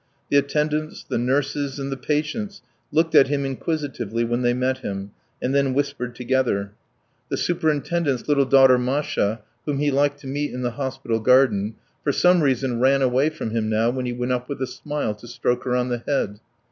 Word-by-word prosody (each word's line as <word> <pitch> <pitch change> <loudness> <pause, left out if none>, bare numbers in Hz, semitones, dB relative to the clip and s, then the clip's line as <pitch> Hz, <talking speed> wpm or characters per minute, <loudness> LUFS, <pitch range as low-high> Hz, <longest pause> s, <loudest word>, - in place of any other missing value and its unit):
The 140 - +5
attendants, 150 +2 0
the - - -1
nurses, 135 +2 0
and 135 0 -4
the - - -1
patients 155 +9 -2 0.3
looked 160 +2 +2
at 135 - +7
him 140 0 -1
inquisitively 135 -5 -2
when 120 +1 -1
they 120 0 +2
met 130 +1 0
him, 100 -4 -5 0.3
and 130 - -1
then 140 -2 +2
whispered 140 -4 -2
together. 120 -6 0 0.6
The - - -1
superintendent's 155 -4 0
little 140 -2 +3
daughter 130 -2 +6
Masha, 125 -5 0 0.3
whom 145 -2 0
he 145 +1 +1
liked 145 +1 +1
to - - -9
meet 145 +2 -2
in 125 - -4
the 120 - 0
hospital 130 -3 -2
garden, 115 -4 +3 0.3
for 145 - +2
some 180 +4 +4
reason 130 -3 +1
ran 135 +2 +4
away 130 +4 +3
from 155 -8 -5
him 110 -1 -1
now 110 +2 +2
when 130 0 -3
he 120 - -2
went 125 +1 -2
up 125 0 -2
with 140 - -4
a - - +1
smile 130 -1 -3
to 105 +3 -14
stroke 125 +1 -1
her 125 -1 +1
on 125 0 0
the 120 -1 -1
head. 105 -8 -1
130 Hz, 195 wpm, -23 LUFS, 120-145 Hz, 0.6 s, at